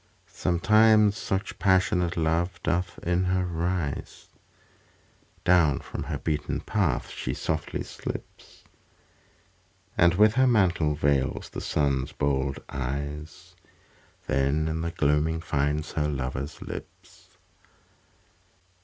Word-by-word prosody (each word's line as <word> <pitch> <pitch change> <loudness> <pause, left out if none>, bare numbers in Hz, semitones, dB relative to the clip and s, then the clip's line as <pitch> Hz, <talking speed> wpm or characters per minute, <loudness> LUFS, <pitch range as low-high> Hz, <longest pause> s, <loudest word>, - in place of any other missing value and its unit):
Sometimes 105 +4 +4
such 100 -2 -3
passionate 90 -2 +2
love 85 +2 0
doth 90 +1 -1
in 90 +2 +1
her 90 0 +1
rise, 85 -3 -3 1.2
Down 85 -5 +4
from - - -7
her - - -3
beaten 75 -2 -2
path 90 -12 -1
she - - -4
softly 80 0 -2
slips, - - -8 1.3
And 85 -1 +4
with 105 +2 +5
her 130 +2 +4
mantle 90 -10 +3
veils 70 -3 0
the - - -6
Sun's 70 -1 0
bold 70 -1 0
eyes, 70 +3 -5 0.7
Then 70 +3 +1
in 80 0 -2
the 85 - -2
gloaming 75 0 +1
finds 75 0 -1
her 75 -1 0
lover's 70 +1 -4
lips. - - -11
80 Hz, 105 wpm, -27 LUFS, 70-90 Hz, 1.3 s, with